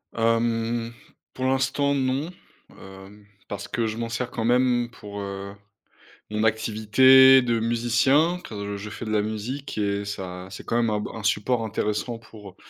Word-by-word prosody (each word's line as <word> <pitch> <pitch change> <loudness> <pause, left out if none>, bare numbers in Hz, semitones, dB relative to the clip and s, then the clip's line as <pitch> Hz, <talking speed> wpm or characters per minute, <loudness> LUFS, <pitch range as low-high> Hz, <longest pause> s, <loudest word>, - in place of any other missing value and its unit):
Hem, 115 0 0 0.4
pour 130 - -4
l'instant 135 +2 +1
non, 135 +4 -1 0.5
heu, 95 +2 -13 0.2
parce 100 0 -6
que 115 -2 -1
je 110 +1 -4
m'en 115 0 -3
sers 120 +1 -3
quand 115 - -3
même 120 0 +2
pour, 105 -3 -9
heu, 100 0 -6 0.8
mon 105 +1 -1
activité 110 +5 +6
de 120 -2 0
musicien, 120 +9 +2
car 100 -1 -5
je 105 +1 -7
fais 105 - -7
de - - -4
la 105 -1 +2
musique 110 +6 -5
et 100 -1 -1
ça 95 -2 -6
c'est 95 - -9
quand 115 - -1
même 115 -1 +2
un 105 -1 0
b - - -5
un 115 - -7
support 115 +4 0
intéressant 110 +2 -2
pour, 105 -4 -14
115 Hz, 165 wpm, -24 LUFS, 105-125 Hz, 0.8 s, activité